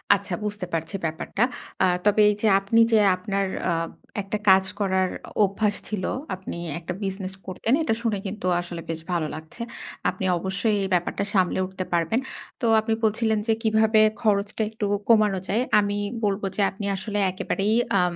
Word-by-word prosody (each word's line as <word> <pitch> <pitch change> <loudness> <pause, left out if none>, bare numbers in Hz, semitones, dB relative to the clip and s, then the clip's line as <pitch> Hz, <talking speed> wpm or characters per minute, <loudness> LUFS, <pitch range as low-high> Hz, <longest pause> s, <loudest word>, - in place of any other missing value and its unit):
আচ্ছা 200 0 -4
বুঝতে 210 -2 -3
পারছি 165 +3 -2
ব্যাপারটা। 160 +7 -1 0.4
অ্যা - - +5 0.2
তবে 210 +1 +4
এই 210 - +1
যে 220 - +3
আপনি 195 +4 +2
যে, 220 - +6 0.2
আপনার 195 +1 -1 0.2
অ্যা 170 - +1 0.5
একটা 195 +2 -3
কাজ 190 0 +7 0.2
করার 190 -2 +1 0.2
অ 210 - +2
অভ্যাস 205 +1 0
ছিল, 210 -4 -3 0.3
আপনি 185 -2 -7 0.2
একটা 175 +1 -5
বিজনেস 190 -1 -4
করতেন, 205 +5 -1
এটা 265 - +1
শুনে 225 -3 0
কিন্তু 195 -1 -4
আসলে 175 -1 -7
বেশ 165 -1 -3
ভালো 170 -3 0
লাগছে। 160 +8 -10 0.5
আপনি 190 - -4
অবশ্যই 195 +4 0
এই 195 - -1
ব্যাপারটা 175 +3 0
সামলে 185 -2 +2
উঠতে 185 0 -5
পারবেন। 170 +7 +2 0.4
তো - - 0
আপনি 220 +1 0
বলছিলেন 220 0 +2
যে, 225 - +4
কিভাবে 220 0 +4 0.2
খরচটা 205 0 +1
একটু 220 -1 -3 0.2
কমানো 210 -4 +4
যায়। 220 +5 +1 0.2
আমি 205 0 0 0.3
বলব 200 0 0
যে, - - 0
আপনি 200 +1 -6
আসলে 205 +2 -3
একেবারেই 195 +3 -1 0.3
আম 180 -1 0
200 Hz, 170 wpm, -25 LUFS, 185-215 Hz, 0.5 s, কাজ